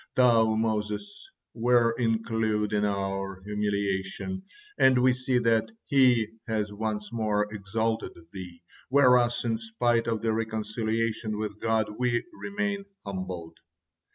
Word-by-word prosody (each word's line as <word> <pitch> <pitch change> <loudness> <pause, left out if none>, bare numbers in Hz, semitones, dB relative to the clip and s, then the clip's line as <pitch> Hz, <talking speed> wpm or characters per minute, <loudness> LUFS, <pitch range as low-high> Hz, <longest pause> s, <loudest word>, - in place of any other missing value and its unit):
Thou, 115 -3 +5
Moses, 110 - -2 0.2
were 120 0 +3
include 110 -2 0
in 105 0 +2
our 95 -1 -2
humiliation, 100 - -2 0.4
and 130 -1 +6
we 125 0 +5
see 125 0 0
that 115 -2 +2 0.2
He 125 -5 +4 0.2
has 105 -2 -1
once 105 -1 -3
more 105 -2 +1
exalted 110 +2 -2 0.2
thee, 90 -3 -9 0.3
whereas, 125 -3 +4
in 115 -1 0
spite 115 +1 0
of 115 -2 -1
the 110 -1 +2
reconciliation 110 0 -1
with 105 -1 -4
God, 110 -1 0
we 120 -2 +1
remain 200 0 -3 0.2
humbled." 95 -4 -6
110 Hz, 120 wpm, -28 LUFS, 105-120 Hz, 0.4 s, and